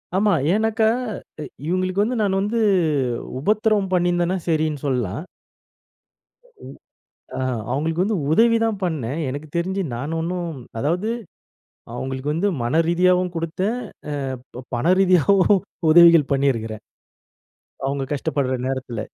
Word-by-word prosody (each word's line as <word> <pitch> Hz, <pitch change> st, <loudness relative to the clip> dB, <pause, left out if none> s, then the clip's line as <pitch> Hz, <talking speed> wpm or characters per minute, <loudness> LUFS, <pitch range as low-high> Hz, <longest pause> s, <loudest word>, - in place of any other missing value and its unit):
ஆமா. 205 Hz, +1 st, +3 dB, 0.2 s
ஏன்னாக்கா, 220 Hz, +1 st, +2 dB, 0.6 s
எ -, -, -6 dB, 0.2 s
இவங்களுக்கு 185 Hz, +2 st, +1 dB
வந்து, 235 Hz, +3 st, -1 dB
நான் 195 Hz, -2 st, +1 dB
வந்து 215 Hz, +4 st, -1 dB, 0.8 s
உபத்திரம் 210 Hz, +3 st, +1 dB
பண்ணியிருந்தேன்னா, 175 Hz, +1 st, +1 dB
சரின்னு 155 Hz, -3 st, 0 dB
சொல்லலாம். 125 Hz, -, -2 dB, 1.2 s
உ -, -, -23 dB, 0.9 s
ஆ -, -, -3 dB, 0.3 s
அவங்களுக்கு 160 Hz, +6 st, 0 dB
வந்து 210 Hz, 0 st, 0 dB
உதவி 230 Hz, +6 st, +5 dB
தான் 220 Hz, -2 st, -1 dB
பண்ணேன். 155 Hz, -5 st, -2 dB
எனக்கு 145 Hz, +4 st, -6 dB
தெரிஞ்சு 190 Hz, +3 st, -1 dB
நான் 145 Hz, +7 st, -4 dB
ஒண்ணும் 175 Hz, +1 st, -3 dB, 0.3 s
அதாவது, 175 Hz, -, 0 dB, 0.9 s
அவங்களுக்கு 130 Hz, +3 st, -3 dB
வந்து 190 Hz, +6 st, +1 dB, 0.2 s
மனரீதியாவும் 175 Hz, +6 st, +2 dB
குடுத்தேன், 185 Hz, +7 st, -2 dB, 0.6 s
அ -, -, -10 dB, 0.2 s
பப் 125 Hz, -, -10 dB
பணரீதியாவும் 185 Hz, +5 st, +4 dB, 0.3 s
உதவிகள் 170 Hz, -3 st, +7 dB
பண்ணியிருக்குறேன். 115 Hz, -6 st, -1 dB, 1.0 s
அவங்க 140 Hz, 0 st, -2 dB
கஷ்டப்படுற 135 Hz, -2 st, -1 dB
நேரத்துல. 125 Hz, -4 st, -4 dB
170 Hz, 110 wpm, -22 LUFS, 140-195 Hz, 1.2 s, உதவிகள்